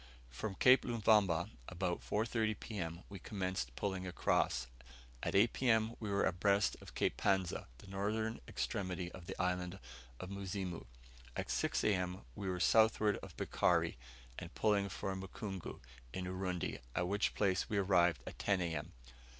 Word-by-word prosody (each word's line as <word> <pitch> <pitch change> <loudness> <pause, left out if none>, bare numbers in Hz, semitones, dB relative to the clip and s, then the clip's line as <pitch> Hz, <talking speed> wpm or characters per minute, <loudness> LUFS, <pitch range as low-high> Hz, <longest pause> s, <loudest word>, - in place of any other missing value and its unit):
From 95 - -4
Cape 125 +6 +7
Luvumba, 105 -7 +3 0.2
about 90 -1 -1
4.30 110 0 0
P.M. 85 -5 -4
we 100 -1 -8
commenced 95 - -3
pulling 95 -2 -2
across; 65 -7 +1 0.6
at - - -1
8 110 +4 +5
P.M. 115 -3 +2
we 105 - -4
were 100 0 +2
abreast 100 +2 +3
of - - -12
Cape - - +1
Panza, 95 -3 +1
the - - -14
northern 105 +3 -2
extremity 90 -2 -2
of 90 -2 -11
the - - -6
island 90 0 0 0.4
of 95 - -6
Muzimu; 95 -5 -4 0.5
at - - -3
6 - - +1
A.M. 90 -2 +1
we 100 -2 -3
were 90 -1 -1
southward 110 +1 +4
of - - -10
Bikari, - - +2 0.4
and 85 -1 -9
pulling 100 -2 +2
for 95 +1 -3
Mukungu, 95 0 -6 0.3
in 95 -1 -3
Urundi, 90 -1 -2 0.2
at 90 +1 +1
which 100 +2 +1
place 95 -3 +1
we 105 - 0
arrived 90 -8 +3
at - - -8
10 100 -2 +2
A.M. 80 -3 -3
95 Hz, 150 wpm, -36 LUFS, 90-105 Hz, 0.6 s, Cape